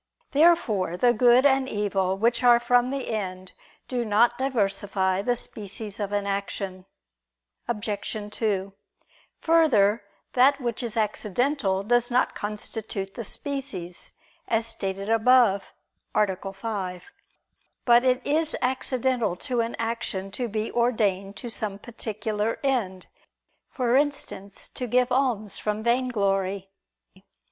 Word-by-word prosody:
Therefore 245 - +3
the 240 +4 +4
good 245 +3 +5
and 270 -1 +3
evil 195 -2 0
which 230 +3 +2
are 240 -1 +6
from 245 +1 +3
the 275 -2 -3
end 185 -3 -4 0.4
do 245 -2 -1
not 230 +2 +3
diversify 195 -6 0
the 245 +4 +1
species 210 -1 -7
of 205 -1 -3
an 205 -1 -1
action. 195 -1 -4 0.8
Obj. 210 -2 -3 0.2
2: 195 -3 -1 0.7
Further, 235 -11 +4 0.3
that 270 +3 +5
which 240 -2 -2
is 235 -2 -4
accidental 215 0 0
does 240 +3 +2
not 250 0 +2
constitute 210 -1 -4
the 235 - -5
species, 240 - -5 0.3
as 225 0 +1
stated 195 -3 -3
above 225 -3 +4 0.4
(A. 195 -2 0
5). 195 - -5 0.7
But 240 0 +6
it 255 -1 +2
is 310 +2 +1
accidental 255 -5 0
to 245 +5 -1
an 230 +1 -3
action 225 -4 -3
to 245 +4 -3
be 215 0 -3
ordained 205 -5 0
to 245 - -7
some 210 -3 -2
particular 220 -1 -3
end; 215 -9 -1 0.6
for 245 -2 0
instance, 275 -9 0
to 250 - -5
give 250 +2 +2
alms 245 -6 0
from 210 0 -2
vainglory. 200 -6 0
225 Hz, 120 wpm, -25 LUFS, 200-250 Hz, 0.8 s, are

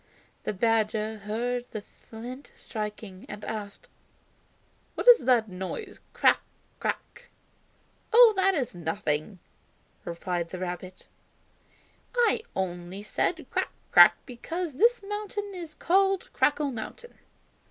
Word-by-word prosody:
The - - -1
badger 220 0 +1
heard 240 +4 -2
the 215 - -5
flint 245 +7 -10
striking, 210 -3 -6
and 210 0 -7
asked: 210 -2 -6 1.1
"What - - -4
is 485 - +8
that 240 -3 +4
noise. 190 - -6
'Crack, - - +4 0.4
crack'?" - - -4 0.8
"Oh, 465 -1 +8
that 385 0 +3
is 265 -6 -1
nothing." 165 +1 -2 0.7
replied 170 0 -3
the 185 - -6
rabbit; 180 0 -6 1.1
"I 475 -2 +3
only 180 +1 -4
said 210 - -1
'Crack, - - -1 0.2
crack' - - +9
because 325 +7 -5
this 465 - +3
mountain 415 -1 -4
is 335 -4 -8
called 385 +2 +2
Crackling 290 -2 +2
Mountain." 475 - -8
225 Hz, 110 wpm, -28 LUFS, -, 1.1 s, crack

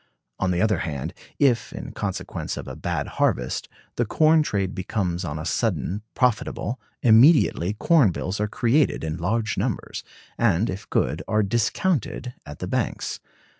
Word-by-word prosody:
On 95 - +1
the 90 +2 +1
other 105 -5 +2
hand, 75 0 -4 0.2
if, 130 -5 +2
in - - -6
consequence - - -4
of - - -6
a - - -6
bad - - -2
harvest, 60 +1 -1 0.3
the 120 - +3
corn 155 +7 +4
trade 100 -10 -1
becomes 95 -2 -2
on 80 -3 -3
a 80 - -5
sudden 90 - -1
profitable, 125 0 0 0.2
immediately 115 - +5
'corn 150 - +4
bills' 90 +3 -3
are 105 - +1
created 120 - +2
in 80 +1 -3
large 110 +5 -1
numbers, - - -3 0.4
and, 105 -2 +2
if 95 +2 -7
good, 75 +2 0
are 105 0 +2
discounted 120 - 0
[at 75 0 -8
the - - -5
banks]. - - -2
105 Hz, 155 wpm, -24 LUFS, 85-120 Hz, 0.4 s, immediately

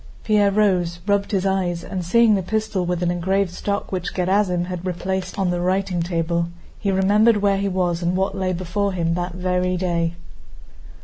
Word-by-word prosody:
Pierre 210 -2 +3
rose, 185 -4 +1
rubbed 200 -1 +1
his 195 -2 0
eyes, 180 -3 0
and 185 -2 -4
seeing 225 +5 +4
the 195 - +2
pistol 215 -1 -1
with 180 0 -1
an 175 - +1
engraved 190 +2 0
stock 200 +2 -3
which 180 -2 -3
Gerásim 180 -1 +1
had 180 -1 -5
replaced 185 +1 -3
on 190 -3 +1
the 175 0 -1
writing 185 -1 0
table, 170 0 -1 0.3
he 200 - -1
remembered 205 +4 +4
where 200 -1 +2
he 200 0 0
was 180 -2 0
and 175 +1 0
what 190 +1 0
lay 190 -1 -1
before 185 +3 -1
him 165 -2 0
that 175 +1 -3
very 180 0 0
day. 170 -2 -1
185 Hz, 185 wpm, -22 LUFS, 175-200 Hz, 0.3 s, seeing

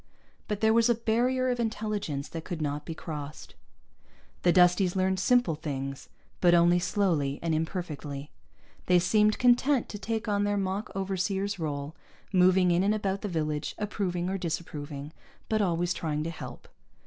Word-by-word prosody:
But 210 -1 -3
there 220 0 +4
was 230 +1 +4
a 240 - +4
barrier 250 +3 +1
of 245 - -2
intelligence 210 -10 -2
that 165 -1 -6
could 170 -1 -5
not 150 -1 -2
be 165 - -4
crossed. 150 -2 -7 0.9
The 175 - +4
Dusties 180 +1 +4
learned 190 0 +1
simple 245 -3 +3
things, 140 -3 -5 0.3
but 175 -1 +5
only 175 +1 +5
slowly 170 -8 0
and 165 -1 0
imperfectly. 155 -4 -4 0.6
They 180 - +5
seemed 210 +4 +3
content 250 +2 +3
to 205 - -6
take 225 +1 -3
on 205 -1 +1
their 205 0 +1
mock 195 +2 -2
overseer's 195 +1 -1
role, 145 -1 -4 0.4
moving 185 0 +5
in 175 +1 +3
and 205 +2 +2
about 200 -2 -2
the - - -3
village, 155 -4 -2
approving 185 -4 -2
or 195 +1 -2
disapproving, 150 -3 -5 0.4
but 215 -1 +2
always 175 -2 +1
trying 150 -2 -2
to 165 - -3
help. 125 -6 -9
180 Hz, 160 wpm, -28 LUFS, 155-205 Hz, 0.9 s, but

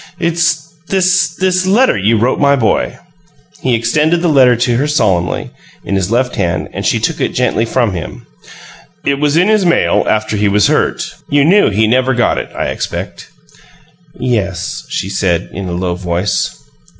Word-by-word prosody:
It's 170 -2 -1
this 185 -2 +1
this 185 0 0
letter 240 +7 +3
you 105 +4 +1
wrote 120 +4 +1
my 140 -1 +4
boy." 120 -5 0 0.6
He 125 -2 +1
extended 150 +9 +1
the 175 - +2
letter 130 -3 +5
to 120 0 0
her 140 +4 0
solemnly, 95 - 0 0.3
in - - -3
his 95 -1 0
left 125 +2 0
hand, 85 -1 -1
and - - -4
she - - +1
took - - -2
it - - -1
gently 115 - +1
from 115 -3 0
him. 85 -3 -7 0.8
"It 140 0 0
was 150 +1 +1
in 180 +3 +3
his 215 -2 +3
mail, 175 -1 +2
after 110 0 0
he 105 0 +1
was 100 0 +3
hurt. - - -1 0.2
You 145 0 +3
knew 200 +6 +4
he 110 +2 +1
never 130 +3 +2
got 120 - +1
it, - - -7
I - - -2
expect." - - -5 0.9
"Yes," 100 -8 -2
she - - -3
said, 95 -3 -1
in 100 -1 -5
a - - -4
low 90 0 -2
voice. 90 +2 -2
125 Hz, 175 wpm, -14 LUFS, 100-165 Hz, 0.9 s, letter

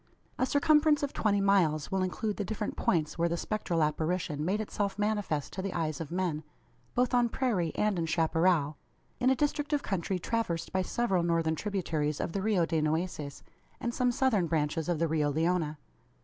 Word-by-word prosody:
A 255 - +2
circumference 300 +1 +4
of 285 - -2
twenty 205 -2 +1
miles 175 -7 +2
will 190 0 +1
include 205 +3 -2
the 205 - -1
different 210 +1 -3
points 160 -1 0
where 170 0 +2
the 170 - -1
spectral 175 -5 -1
apparition 155 0 -1
made 190 +6 0
itself 205 -2 -2
manifest 205 -8 -1
to 190 - -3
the 195 0 -3
eyes 155 -3 -2
of 155 - -5
men 175 -4 -1 0.5
both 250 +1 +2
on 240 -1 +4
prairie 210 -11 0
and 210 -4 +1
in 165 - -1
chapparal 160 -2 +2 0.4
in 255 +1 +3
a 265 - +4
district 295 +2 -1
of 290 - +1
country 190 -1 -1
traversed 180 -4 -2
by 190 - +2
several 195 -2 0
northern 165 -1 +1
tributaries 160 -6 -2
of - - -2
the 195 - -2
Rio 200 -4 +2
de 160 -1 0
Nueces, 155 -2 -2 0.4
and 235 - -2
some 250 0 +2
southern 235 -8 +2
branches 160 +1 -1
of 175 - +1
the 165 +2 +1
Rio 155 -2 +1
Leona. 160 0 0
180 Hz, 190 wpm, -30 LUFS, 160-215 Hz, 0.5 s, circumference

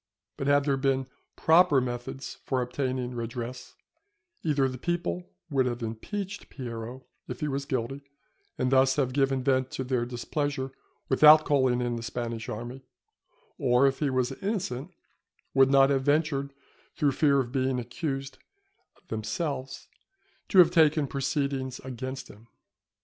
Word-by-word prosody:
But 135 - -3
had 145 0 +4
there 140 -2 +2
been 135 -1 +1 0.3
proper 160 -3 +5
methods 125 +1 -5
for 130 - -1
obtaining 125 0 -2
redress, 120 +1 -6 0.7
either 145 -4 +2
the 130 -1 -6
people 90 - -2 0.2
would 130 -2 +2
have 120 -1 -3
impeached 195 - -5
Piero 120 0 -7 0.2
if 125 - -7
he 150 - 0
was 140 -1 -2
guilty, 130 +2 -2 0.6
and 125 0 0
thus 130 0 +4
have 130 -3 0
given 135 -1 +1
vent 130 -1 +2
to 130 - -2
their 125 -2 -1
displeasure 135 +2 -3 0.4
without 155 +3 +7
calling 130 -4 +2
in 120 -1 -1
the - - -5
Spanish 115 0 -4
army; 120 +4 -6 0.8
or 130 -2 +4
if 135 -1 +1
he 150 - +1
was 130 -1 0
innocent, 185 - -2 0.6
would 135 -1 +5
not 135 0 +5
have 135 -1 +2
ventured, 145 -1 +1 0.4
through 145 -3 +2
fear 140 0 +3
of 120 -2 -2
being 130 -1 0
accused 135 +2 -4 0.7
themselves, 130 +5 -4 0.6
to 195 - +1
have 175 -2 +8
taken 155 -3 +4
proceedings 135 -1 -2
against 130 +1 -6
him. 110 +3 -16
130 Hz, 145 wpm, -28 LUFS, 125-140 Hz, 0.8 s, have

